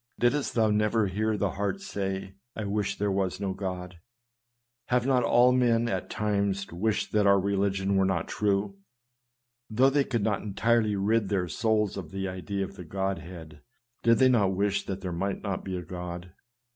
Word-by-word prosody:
Didst 135 Hz, +4 st, +1 dB
thou 110 Hz, -2 st, +3 dB
never 105 Hz, +1 st, +2 dB
hear 105 Hz, +3 st, -1 dB
the 100 Hz, -2 st, 0 dB
heart 100 Hz, -, -2 dB
say, 95 Hz, -, -4 dB
" 125 Hz, -, -56 dB
I 110 Hz, -, -4 dB
wish 100 Hz, 0 st, -1 dB
there 100 Hz, 0 st, 0 dB
were 95 Hz, -1 st, +1 dB
no 100 Hz, -2 st, -2 dB
God? 90 Hz, -2 st, -5 dB, 0.4 s
" 120 Hz, 0 st, -56 dB
Have 125 Hz, -1 st, +1 dB
not 130 Hz, -2 st, +3 dB
all 120 Hz, +2 st, +5 dB
men, 120 Hz, -2 st, +3 dB
at 95 Hz, -5 st, -3 dB
times, 100 Hz, -2 st, 0 dB
wished 105 Hz, +5 st, -1 dB
that 105 Hz, -1 st, +3 dB
our 100 Hz, 0 st, +6 dB
religion 100 Hz, 0 st, 0 dB
were 95 Hz, -, +3 dB
not 90 Hz, -4 st, 0 dB
true? 100 Hz, -1 st, -1 dB, 0.9 s
Though 130 Hz, +5 st, +4 dB
they 140 Hz, 0 st, +3 dB
could 115 Hz, -6 st, -2 dB
not 105 Hz, -1 st, 0 dB
entirely 110 Hz, +1 st, +1 dB
rid 105 Hz, +1 st, +1 dB
their 95 Hz, -3 st, 0 dB
souls 105 Hz, +4 st, 0 dB
of 90 Hz, -5 st, -6 dB
the 95 Hz, +2 st, -3 dB
idea 95 Hz, +2 st, -3 dB
of 100 Hz, -, -12 dB
the 90 Hz, -, -7 dB
Godhead, 85 Hz, -4 st, -5 dB, 0.4 s
did 115 Hz, 0 st, +4 dB
they 130 Hz, -, +5 dB
not 100 Hz, -6 st, +3 dB
wish 100 Hz, +1 st, 0 dB
that 95 Hz, 0 st, -4 dB
there 95 Hz, -2 st, -4 dB
might 95 Hz, +3 st, -2 dB
not 100 Hz, -3 st, -3 dB
be 95 Hz, -1 st, -4 dB
a 90 Hz, -, -5 dB
God? 90 Hz, 0 st, -7 dB
100 Hz, 190 wpm, -28 LUFS, 95-110 Hz, 0.9 s, our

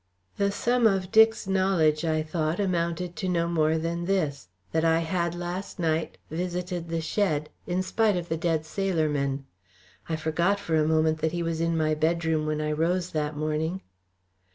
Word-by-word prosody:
The 200 Hz, 0 st, +2 dB
sum 240 Hz, +3 st, +2 dB
of 195 Hz, -3 st, 0 dB
Dick's 220 Hz, 0 st, +5 dB
knowledge, 185 Hz, -5 st, +2 dB
I 155 Hz, -1 st, +1 dB
thought, 155 Hz, +1 st, -1 dB
amounted 175 Hz, -2 st, -1 dB
to 185 Hz, -, -2 dB
no 170 Hz, -1 st, +1 dB
more 160 Hz, -1 st, +2 dB
than 170 Hz, +1 st, -2 dB
this 155 Hz, -, -1 dB, 0.2 s
that 160 Hz, -, +1 dB
I 165 Hz, 0 st, +3 dB
had 170 Hz, 0 st, -1 dB
last 175 Hz, +3 st, -5 dB
night 160 Hz, -2 st, -1 dB
visited 175 Hz, 0 st, -3 dB
the 165 Hz, 0 st, -1 dB
shed, 155 Hz, -4 st, 0 dB, 0.2 s
in 185 Hz, +1 st, 0 dB
spite 215 Hz, 0 st, +2 dB
of 175 Hz, -1 st, -4 dB
the 160 Hz, -, -1 dB
dead 160 Hz, -1 st, 0 dB
sailor 170 Hz, -2 st, 0 dB
men. 140 Hz, -1 st, -1 dB, 0.6 s
I 160 Hz, -, 0 dB
forgot 170 Hz, +6 st, +1 dB
for 165 Hz, -5 st, -1 dB
the 150 Hz, -, +1 dB
moment 155 Hz, 0 st, +2 dB
that 160 Hz, +1 st, 0 dB
he 175 Hz, -1 st, -1 dB
was 165 Hz, -1 st, -2 dB
in 165 Hz, 0 st, +1 dB
my 155 Hz, -1 st, +2 dB
bedroom 160 Hz, 0 st, +1 dB
when 155 Hz, 0 st, -1 dB
I 150 Hz, 0 st, -1 dB
rose 175 Hz, +4 st, 0 dB
that 150 Hz, -2 st, -2 dB
morning. 155 Hz, +4 st, -1 dB
165 Hz, 180 wpm, -27 LUFS, 155-180 Hz, 0.6 s, Dick's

